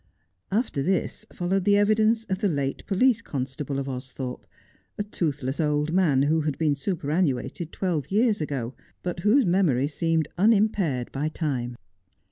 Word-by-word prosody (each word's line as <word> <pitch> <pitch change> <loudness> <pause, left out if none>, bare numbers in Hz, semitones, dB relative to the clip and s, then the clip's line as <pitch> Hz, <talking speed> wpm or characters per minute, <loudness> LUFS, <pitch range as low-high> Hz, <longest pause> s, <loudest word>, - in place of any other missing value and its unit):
After 210 - 0
this 185 +6 -1
followed 185 +2 0
the 205 +1 +4
evidence 215 +2 +3
of 190 -4 -3
the 210 - +2
late 140 -5 -2
police 230 +3 +3
constable 135 - -4
of 135 0 -3
Austhorpe, 130 -1 -6 0.5
a 205 - -1
toothless 150 -9 -2
old 150 0 +1
man 155 -8 +3
who 155 +2 +2
had 150 -2 -2
been 155 -3 +2
superannuated 155 0 -1
twelve 175 -7 -2
years 215 -1 +2
ago, 135 -5 -3 0.3
but 175 -1 -3
whose 215 +8 +4
memory 170 -8 +2
seemed 165 +1 0
unimpaired 200 - +2
by 145 +3 -1
time. 130 -7 -2
160 Hz, 145 wpm, -26 LUFS, 140-195 Hz, 0.5 s, the